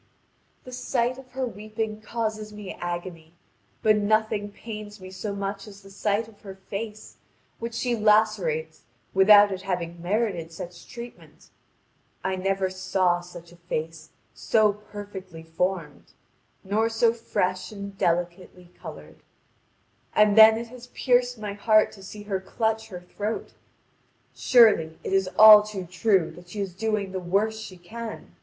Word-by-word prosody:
The 255 - -11
sight 250 0 -1
of 255 -2 -15
her 260 0 -1
weeping 215 -1 -5
causes 215 -1 -3
me 210 -2 -8
agony, 175 -2 -6 0.5
but 215 -1 +5
nothing 210 0 +1
pains 210 -1 -9
me 185 0 -10
so 200 +2 -5
much 200 +1 -4
as 200 -1 -13
the 195 - -14
sight 205 +2 -1
of 220 -2 -19
her 195 -2 -9
face, 210 +3 -7 0.4
which 230 0 -5
she 245 0 0
lacerates 210 -8 +2 0.3
without 205 +1 +7
its 190 -1 -4
having 175 -3 -4
merited 180 -3 -1
such 170 +1 -9
treatment. 240 0 -12 0.7
I 190 - 0
never 195 +1 0
saw 185 -1 +1
such 175 -1 -12
a 175 - -16
face 165 -2 -5 0.2
so 215 -2 +2
perfectly 200 -5 -10
formed, 165 -2 -3 0.5
nor 215 +4 +1
so 225 0 +3
fresh 185 -5 -2
and 200 -1 -8
delicately 175 0 -2
coloured. - - -10 1.0
And 210 -1 +5
then 220 0 +9
it 230 0 -6
has 250 0 -12
pierced 245 -1 +1
my 210 -2 -5
heart 215 +1 +3
to 195 - -14
see 205 +2 -9
her 200 -2 -2
clutch 220 +3 -1
her 180 -5 -8
throat. 205 +4 -5 0.8
Surely, 210 -10 +4
it - - -3
is 195 -1 +2
all 215 -1 +11
too 210 -3 -6
true 180 -1 +1
that 175 +2 -15
she 210 - -7
is 195 -3 -3
doing 210 -1 -2
the 190 - -3
worst 205 +5 0
she 185 - -10
can. 220 +6 -9
205 Hz, 150 wpm, -25 LUFS, 180-220 Hz, 1.0 s, all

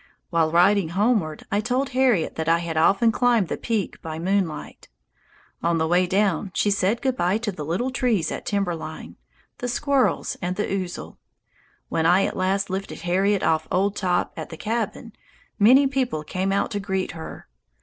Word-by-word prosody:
While 165 -2 +2
riding 180 +1 +4
homeward 205 -8 +1
I 205 +1 +1
told 255 +5 -1
Harriet 255 -9 +2
that 160 0 -2
I 165 - +5
had 170 -1 -4
often 195 +8 +4
climbed 235 -6 +2
the - - -1
peak 220 -5 -3
by 160 -1 -6
moonlight. 175 -3 -2 0.7
On 170 0 +1
the 160 0 +1
way 180 +2 +3
down 195 0 +1
she 205 - +2
said 200 +5 0
good 260 -2 +1
bye 180 -1 +1
to 225 -2 -3
the 160 -5 -7
little 185 - -1
trees 240 -9 0
at - - -5
timber 200 -4 0
line, 160 -1 -8 0.4
the 245 - -3
squirrels, 275 +2 0
and 180 +1 -2
the 210 - -1
ouzel. 185 -2 -5 0.7
When 160 0 +1
I 180 +3 +4
at - - -3
last 195 +1 0
lifted 190 -3 -4
Harriet 190 +3 +1
off 160 0 +1
old 195 +2 +1
Top 180 -2 0
at - - -6
the 160 - -9
cabin, 225 +2 -3 0.5
many 255 +7 +6
people 255 - -1
came 185 +5 -2
out 200 - 0
to 205 - -2
greet 190 -1 -2
her. 160 -1 -9
195 Hz, 180 wpm, -24 LUFS, 170-225 Hz, 0.7 s, many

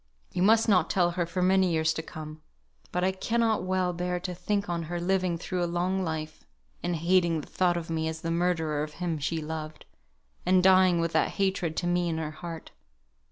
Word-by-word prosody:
You 180 - -1
must 220 +4 +5
not 180 -6 +3
tell 175 -2 +2
her 175 -1 -1
for 180 +2 -1
many 190 0 +4
years 160 -1 +2
to - - -3
come; 155 -1 -9 0.5
but 180 - -1
I 190 - +3
cannot 225 +3 0
well 185 -1 0
bear 180 +1 -2
to 180 0 -4
think 200 +3 -1
on 170 -1 -2
her 175 0 -2
living 180 -1 0
through 180 +1 -2
a 175 - -1
long 180 +2 0
life, 155 -2 -4 0.4
and 175 - -1
hating 170 0 +2
the - - -12
thought 175 -2 +1
of 165 -1 -5
me 160 -1 -1
as 160 0 -4
the 165 - -2
murderer 165 -3 0
of 150 0 -4
him 170 -3 -3
she 160 +2 -2
loved, 155 0 -6 0.6
and 185 0 +3
dying 185 -2 +5
with 165 0 -1
that - - +2
hatred 190 -5 0
to 175 - -1
me 175 0 +1
in 160 - -2
her 155 -1 -3
heart. 165 +1 -8
175 Hz, 210 wpm, -28 LUFS, 160-185 Hz, 0.6 s, must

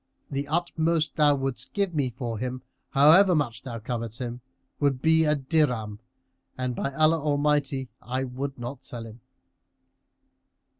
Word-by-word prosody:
The 140 +1 -2
utmost 165 0 0
thou 145 -2 +5
wouldst 135 -2 -4
give 200 -3 0
me 140 -5 0
for 120 -2 -5
him, 125 +1 -4 0.3
however 170 +7 +6
much 120 -6 -1
thou 120 -3 -6
covet 115 0 -4
him, 120 -1 -5 0.4
would 140 -3 +1
be 160 +2 +4
a 150 0 +3
dirham, 130 -8 0 0.6
and, 125 -1 -2
by 140 - -2
Allah 155 +2 +4
Almighty 145 -2 +1
I 130 +2 -2
will 135 +2 -4
not 120 +2 -7
sell 115 -2 -7
him!" 115 +1 -12
135 Hz, 145 wpm, -26 LUFS, 125-150 Hz, 0.6 s, however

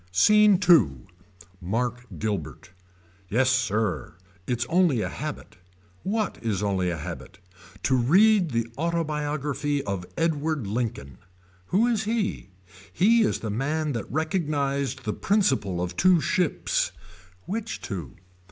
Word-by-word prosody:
SCENE 210 - +5
II. 90 - +5 0.6
Mark 120 +6 -2
Guilbert. 90 -9 -4 0.6
Yes 130 +4 +3
sir. 110 -6 -1 0.3
It's 120 -1 -1
only 165 -4 +2
a - - -2
habit. - - -7 0.4
What 215 0 -2
is 105 -4 -1
only 95 -3 0
a 85 - -2
habit. 75 - -8 0.5
To 130 - +2
read 180 - +4
the 115 -3 -1
autobiography 150 -3 -1
of 95 -3 -4
Edward 155 -4 0
Lincoln. 100 - -4 0.5
Who 210 +5 +3
is 225 -3 0
he. 215 - -2 0.4
He 230 +5 +4
is 215 - +1
the 110 - -3
man 150 +7 -1
that 115 -5 -5
recognized 145 -4 -1
the 105 - -2
principle 185 - +1
of 90 0 -3
two 185 -2 +5
ships. 180 0 0 0.5
Which 220 +3 -4
two. 95 -4 -6
140 Hz, 125 wpm, -25 LUFS, 105-175 Hz, 0.6 s, SCENE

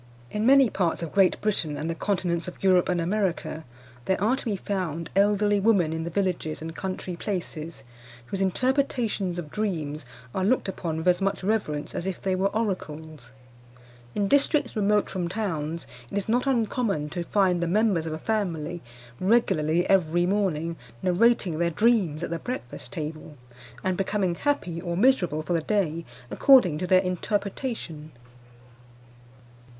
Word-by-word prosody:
In 210 +2 0
many 270 -1 +7
parts 180 -5 -1
of 165 - -5
Great 195 -2 +3
Britain, 170 -8 -1
and 150 +2 -3
the 165 - -1
continents 175 -2 -1
of 180 - -9
Europe 185 -2 +4
and 180 -1 +1
America, 170 -4 -1 0.4
there 190 - +1
are 220 +7 +2
to 270 - -8
be 215 -4 0
found 180 -5 -3
elderly 205 +1 +3
women 195 -6 +3
in 160 0 -3
the - - -3
villages 180 -4 -1
and 160 +1 -7
country 185 -1 -4
places 170 -5 -5 0.4
whose 195 +9 -4
interpretations 230 -3 0
of 155 -4 -6
dreams 155 -8 -2 0.3
are 190 - -1
looked 235 +4 +2
upon 170 -4 -3
with 160 +3 -3
as 180 0 +4
much 195 0 -1
reverence 185 -8 -1
as 175 - -3
if 190 - -3
they 190 - -1
were 190 +1 +2
oracles. 160 - -4 0.9
In 200 -1 +1
districts 285 +1 +2
remote 210 0 +2
from 180 -2 -3
towns 170 -6 -3 0.2
it - - -3
is 200 - -2
not 245 +4 +1
uncommon 225 - 0
to 175 - -3
find 185 -1 +2
the 170 - 0
members 190 -3 +2
of 155 - -3
a - - -3
family 175 -4 -2 0.4
regularly 185 -5 +2
every 175 -2 +3
morning 170 -4 0 0.3
narrating 185 -2 +3
their 170 0 +2
dreams 185 -5 +2
at - - -4
the 170 - -2
breakfast 130 - -6
table, 155 -1 -6 0.5
and 185 -1 +1
becoming 195 -2 0
happy 180 - -1
or 170 -1 -3
miserable 180 - +3
for 175 - -2
the 165 - +1
day 170 -4 0 0.3
according 205 - +5
to 180 - -2
their 185 0 +5
interpretation. 190 - -3
185 Hz, 160 wpm, -26 LUFS, 165-210 Hz, 0.9 s, many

